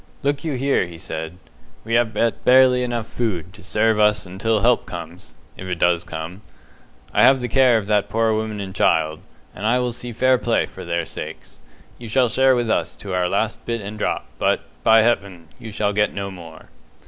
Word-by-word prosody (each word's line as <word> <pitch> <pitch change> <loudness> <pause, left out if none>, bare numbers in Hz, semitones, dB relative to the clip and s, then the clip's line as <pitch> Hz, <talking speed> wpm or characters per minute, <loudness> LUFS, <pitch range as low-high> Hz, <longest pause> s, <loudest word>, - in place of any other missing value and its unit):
"Look 145 +2 0
you 160 -3 -2
here," 135 -7 +1
he 85 -1 -11
said. 80 +1 -6 0.5
"We 115 - -4
have 115 -1 +3
but 115 +2 -1
barely 125 0 +5
enough 120 -2 -2
food 95 -8 -3
to 105 - -14
serve 110 0 +1
us 105 -1 +3
until 100 +4 -1
help 120 +1 +2
comes 85 0 -9 0.2
if 95 - -8
it 90 -1 -3
does 85 0 +2
come. 80 +5 -7 0.7
I - - +3
have 135 0 +6
the 125 - -3
care 125 0 +4
of 105 - -3
that 105 -1 +1
poor 115 0 +1
woman 110 -1 -3
and 95 -1 -6
child, 80 -4 +1 0.3
and 100 - -9
I 115 +3 +3
will 125 -1 0
see 120 +1 -6
fair 130 +2 +2
play 120 -1 +1
for - - -11
their 85 -1 -2
sakes. - - -8 0.4
You 120 - -8
shall 125 +2 +2
share 130 +2 +4
with 120 -1 0
us - - -1
to 100 -2 -7
our 90 -1 +1
last 110 +3 -1
bit 115 0 -1
and 105 +2 -7
drop, - - -1
but, - - +1 0.2
by 110 0 +6
Heaven, 100 -8 -1
you 110 - -8
shall 105 0 0
get 105 0 +1
no 100 0 -4
more." 85 -4 -12
110 Hz, 205 wpm, -21 LUFS, 90-120 Hz, 0.7 s, have